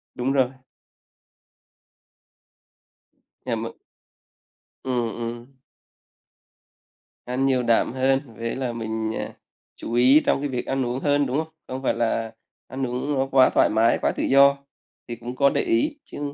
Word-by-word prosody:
Đúng 130 +2 -1
rồi. 130 -2 +3 3.0
À, - - -3
m - - -3 1.1
Ừm, 125 -3 -1
ừm. 120 +3 -7 1.7
Ăn 125 +2 -1
nhiều 130 -2 +2
đạm 115 -1 +2
hơn, 135 +1 +2 0.2
với 115 0 -3
là 130 -3 -3
mình, 110 -1 -3
à, - - -4 0.5
chú 115 - -7
ý 130 +5 +6
trong 155 - +1
cái 145 - -2
việc 125 -2 -3
ăn 135 -1 -1
uống 125 +2 -2
hơn, 145 0 +2
đúng 130 +2 -1
không? 160 0 -3
Không 130 +1 -6
phải - - +2
là 115 -1 -1 0.4
ăn 130 -1 -3
uống 125 +4 -2
nó 135 -1 0
quá 130 -1 +6
thoải - - +3
mái, 115 +2 +3
quá - - +2
tự - - -2
do 140 +1 +5 0.5
thì 120 - -5
cũng 120 +2 -8
có 140 0 +4
để - - 0
ý. 315 -4 0
Chứ - - -9
130 Hz, 155 wpm, -24 LUFS, 120-135 Hz, 3.0 s, ý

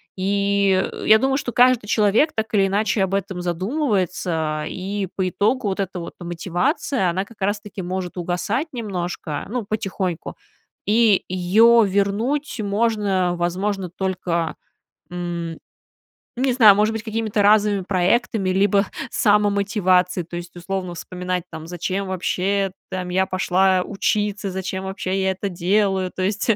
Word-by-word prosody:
И, 200 0 +2
э, - - -8
я 220 - +8
думаю, 270 +1 +1
что 245 - -3
каждый 250 -3 +4
человек 215 +9 +3
так 220 0 -2
или 195 -1 +4
иначе 205 0 +1
об 190 0 -2
этом 190 -2 -2
задумывается, 180 - -1
и 195 +1 -4
по 185 -1 0
итогу 215 +4 0
вот 190 - -3
эта 185 -2 -3
вот 170 - -8
мотивация, 180 - -1
она 190 +3 -2
как 210 -2 -18
раз-таки 205 0 -2
может 180 0 -4
угасать 180 - -1
немножко, 180 -8 -4
ну, 240 -1 -2
потихоньку. 195 -4 -3 0.5
И 215 -2 +4
её 215 +6 +5
вернуть 215 +8 0
можно, 200 -4 +1
возможно, 185 +2 -1
только, 180 -3 -2 0.6
м, 170 -2 -4 0.8
не 260 0 +1
знаю, 215 -5 +7
может 215 +1 +2
быть, 225 -1 -4
какими-то 220 -1 -1
разовыми 205 -1 +4
проектами 190 +2 +1
либо 200 +1 +3 0.2
самомотивацией. 200 -4 +2
То 175 - -7
есть, 175 0 -8
условно, 180 0 -4
вспоминать, 180 +1 -4
там, 160 0 -8
зачем 185 +3 -3
вообще 190 +1 0 0.2
там 185 -1 -4
я 190 +1 +2
пошла 185 0 +2
учиться, 205 0 -1
зачем 190 0 -4
вообще 190 0 -2
я 190 0 +2
это 195 +2 -4
делаю. 190 +1 +1
То 185 - -4
есть 200 +4 0
195 Hz, 140 wpm, -22 LUFS, 180-210 Hz, 0.8 s, я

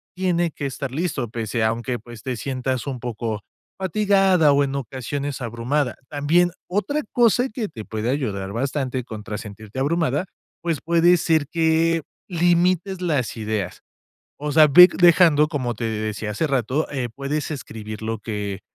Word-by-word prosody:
tiene 175 -2 +1
que 145 - -6
estar 140 0 -4
listo", 135 -6 -2
pese 115 0 -2
aunque 120 +2 -1
pues 120 0 -12
te 130 -1 -2
sientas 130 +2 -3
un 130 -3 -3
poco 115 -3 -4 0.4
fatigada 190 -4 +3
o 140 0 +4
en 140 -1 -2
ocasiones 135 +2 -4
abrumada. 120 +4 -1
También 155 +5 +2 0.2
otra 210 +11 -1
cosa 245 +2 +3
que 215 -1 -3
te 115 -9 -9
puede 110 +1 -3
ayudar 100 -8 -2
bastante 130 +1 -2
contra 105 -3 -6
sentirte 110 +3 -8
abrumada, 155 +1 +1 0.4
pues 165 -3 -1
puede 170 +1 +4
ser 160 -3 +2
que 165 0 +2 0.3
limites 175 +2 +2
las 150 -9 0
ideas. 110 -3 -3 0.6
O 150 +1 -3
sea, 155 +1 +7
ve 180 +6 +9
dejando, 170 -4 +6
como 135 -6 -2
te 115 - -5
decía 110 -1 -3
hace 110 +10 -1
rato, 135 +2 0
eh, 130 -4 -2
puedes 140 +2 -3
escribir 110 -7 -7
lo 110 0 -2
que, 105 -2 -4
140 Hz, 155 wpm, -22 LUFS, 115-165 Hz, 0.6 s, ve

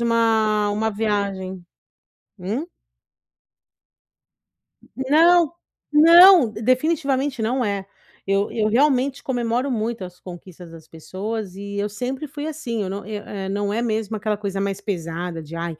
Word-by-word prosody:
uma 220 -3 +2
uma 220 +2 0
viagem. 200 -3 -2 0.8
Hum? 210 - -3 2.3
Não, 320 +5 +4 0.4
não, 335 -1 +8
definitivamente 265 +2 0
não 250 +3 0
é, 200 -2 -2 0.4
eu 195 +1 +1
eu 215 -2 0
realmente 270 +3 +2
comemoro 245 +1 -1
muito 225 -3 -2
as 180 0 -12
conquistas 175 -1 -11
das 165 -1 -13
pessoas 190 +4 -6
e 200 0 -7
eu 205 +1 -1
sempre 255 +7 -4
fui 290 +1 -6
assim, 265 -8 -4
eu 190 - -4
não 200 0 -5
eu 210 0 -6
eh, 195 -2 -6
não 205 +1 -2
é 230 - -1
mesmo 220 -1 -2
aquela 215 0 -2
coisa 195 -1 -4
mais 195 -1 -2
pesada 170 -3 -4
de: 155 +2 -10
"Ai, 165 -1 -4
215 Hz, 135 wpm, -22 LUFS, 195-255 Hz, 2.3 s, não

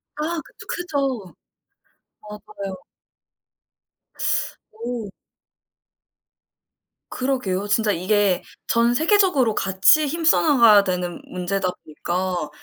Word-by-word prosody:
아 320 +3 -3
그쵸. - - -15
크죠. 275 - -3 0.9
아 210 - -8
맞아요. 200 -2 -7 2.0
오. 230 -1 -6 2.0
그러게요. 250 -7 -2
진짜 210 0 +2
이게 190 +1 +1 0.2
전 235 +1 +2
세계적으로 315 - +3
같이 195 +11 +4
힘써나가야 280 -9 +4
되는 180 -2 -3
문제다 185 +1 -2
보니까 175 +1 -3
215 Hz, 185 characters per minute, -22 LUFS, 190-275 Hz, 2.0 s, 같이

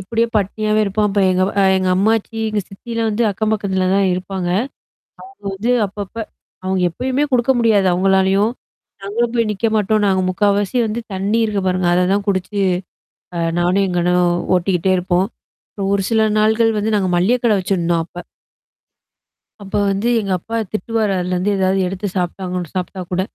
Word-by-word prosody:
இப்படியே 225 +5 0
பட்னியாவே 215 +2 0
இருப்போம். 210 +1 0
அப்ப 200 0 0
எங்க 185 0 +2
வ - - -5 0.2
எங்க 185 0 0
அம்மாச்சி, 220 +3 +1
எங்க 215 -1 -1
சித்திலாம் 230 +3 -3
வந்து 215 +3 0
அக்கம் 215 +2 -1
பக்கத்துல 190 -3 0
தான் 200 0 +3
இருப்பாங்க. 185 0 -3 0.8
அவுங்க 390 - -21
வந்து 215 +6 -1 0.2
அப்பப்ப 200 0 -8 0.5
அவுங்க 190 0 0
எப்பயுமே 260 - -1
குடுக்க 250 +1 +3
முடியாது 220 -5 +3
அவுங்களாலயும். 190 +3 +3 0.5
நாங்களும் 230 +4 -1
போய் 230 -2 +1
நிக்க 220 +3 0
மாட்டோம். 215 0 +1
நாங்க 190 -1 +2
முக்கவாசி 205 +2 +1
வந்து, 220 +2 -3
தண்ணீ 195 +4 0
இருக்கு 210 -2 -1
பாருங்க. 185 -1 +1
அததான் 185 +3 +1
குடிச்சு. 195 +1 -1 0.8
அ - - -2 0.2
நானும் 180 +3 +2
எங்க 180 -1 -1
அண்ணும் 180 0 +2 0.2
ஓட்டிக்கிட்டே 180 0 +1
இருப்போம். 180 +1 +1 0.4
அப்றம் 195 -1 -3
ஒரு 200 - +1
சில 220 -1 +3
நாள்கள் 220 +1 +3
வந்து 215 +1 0
நாங்க 190 -3 0
மளிகை 200 +8 +2
கடை 225 -3 +4
வச்சசிருந்தோம் 175 -3 0
அப்ப. 175 - -9 1.4
அப்ப 195 -1 -11 0.2
வந்து 195 +4 -1
எங்க 200 -3 -3
அப்பா 225 +6 -6 0.2
திட்டுவாரு 215 +1 -1
அதுலருந்து 180 +2 -1
ஏதாவது 190 0 +1
எடுத்து 195 +2 -4
சாப்ட்டாங்கன்னு 180 -1 -3
சாப்பி்ட்டா 185 +1 -4
கூட. 180 +1 +1
195 Hz, 160 wpm, -18 LUFS, 185-215 Hz, 1.4 s, கடை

